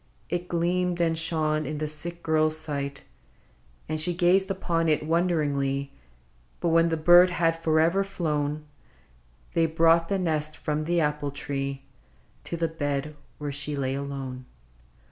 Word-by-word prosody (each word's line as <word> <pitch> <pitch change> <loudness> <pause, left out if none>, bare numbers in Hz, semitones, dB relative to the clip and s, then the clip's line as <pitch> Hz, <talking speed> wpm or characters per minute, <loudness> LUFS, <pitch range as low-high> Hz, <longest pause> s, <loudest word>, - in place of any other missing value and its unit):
It 175 0 -2
gleamed 175 +1 0
and 165 -1 +2
shone 155 -2 0
in 150 +1 -4
the 155 +1 -2
sick 170 +3 -7
girl's 155 0 +2
sight, 140 -3 -3 0.8
And 155 0 -1
she 175 +2 +1
gazed 185 +2 +3
upon 170 -4 0
it 150 -1 +1
wonderingly: 145 -5 0 0.7
But 170 - 0
when 165 +1 +4
the 165 - 0
bird 175 +3 +7
had 165 -2 +1
forever 165 +3 +2
flown. 150 -5 -2 0.9
They 165 -1 +3
brought 165 +1 +3
the 195 - +1
nest 155 -4 -1
from 150 0 -2
the 170 +1 +1
apple 150 -1 -1
tree 140 -1 -4 0.6
To 170 - -4
the 165 0 0
bed 145 -2 -3 0.2
where 145 -1 -4
she 145 +1 -2
lay 135 -1 -1
alone. 135 -2 -5
155 Hz, 145 wpm, -26 LUFS, 145-170 Hz, 0.9 s, bird